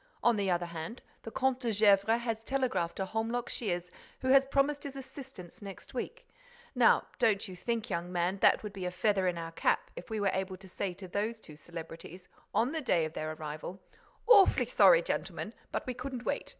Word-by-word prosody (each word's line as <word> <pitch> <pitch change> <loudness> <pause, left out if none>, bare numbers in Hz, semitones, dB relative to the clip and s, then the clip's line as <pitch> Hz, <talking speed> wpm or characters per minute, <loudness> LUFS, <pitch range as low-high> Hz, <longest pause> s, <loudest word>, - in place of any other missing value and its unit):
On 240 - +5
the 200 -2 0
other 175 -1 +1
hand, 170 +7 -7 0.2
the - - -7
Comte 265 +1 +1
de 240 -3 -1
Gesvres 210 +2 +4
has 225 -2 -2
telegraphed 255 -11 0
to 190 - -2
Holmlock 225 +4 -2
Shears, 180 -5 -2 0.3
who 260 - -1
has 270 0 +6
promised 280 +1 +2
his 280 -1 -6
assistance 265 - -10
next 195 -2 -9
week. 470 - -5 0.5
Now - - +5
don't 220 -4 +2
you 185 - -8
think, 230 +5 -2
young 170 +1 -2
man, 180 +2 0
that - - +6
it - - -15
would 210 -1 -6
be 190 -2 -5
a - - 0
feather 190 +1 +1
in 175 -1 0
our 165 0 -5
cap - - 0
if - - -9
we 220 -1 -2
were 200 -2 +2
able 190 0 -2
to 190 +1 -14
say 185 0 -3
to 190 0 -9
those 215 +5 -2
two 155 -7 -13
celebrities, 165 +2 -9 0.2
on 240 +4 +2
the 320 0 -2
day 175 - +2
of 155 - -6
their 155 0 -3
arrival, 155 +4 -6 0.5
'Awfully 415 -5 +7
sorry, - - +6
gentlemen, - - -3 0.2
but - - -2
we 255 - -2
couldn't 255 -1 -6
wait. - - -2
205 Hz, 210 wpm, -31 LUFS, 180-250 Hz, 0.5 s, Awfully